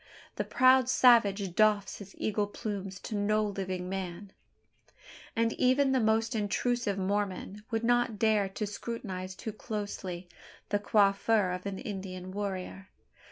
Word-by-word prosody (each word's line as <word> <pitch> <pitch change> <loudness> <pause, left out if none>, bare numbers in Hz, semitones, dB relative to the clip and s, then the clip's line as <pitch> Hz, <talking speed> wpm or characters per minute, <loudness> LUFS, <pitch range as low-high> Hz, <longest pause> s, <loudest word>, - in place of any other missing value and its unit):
The - - 0
proud 255 -1 +4
savage 205 -8 +4
doffs 210 -1 +2
his 195 -1 -11
eagle 210 -1 0
plumes 195 -2 -5
to - - -6
no 215 +1 +1
living 190 -3 -3
man; 190 0 -5 1.0
and 230 0 +1
even 265 +2 +3
the 260 - +3
most 225 +1 +2
intrusive 220 0 0
Mormon 200 +1 -2
would 225 -1 -1
not 240 -1 +2
dare 210 -2 +2
to 210 +2 -3
scrutinise 195 -3 -5
too 220 - -6
closely 200 -5 -5 0.4
the 205 - +1
coiffure 200 -1 +3
of 180 +2 -5
an 195 -1 -4
Indian 185 -3 -6
warrior. 195 -1 -5
205 Hz, 135 wpm, -30 LUFS, 190-225 Hz, 1.0 s, proud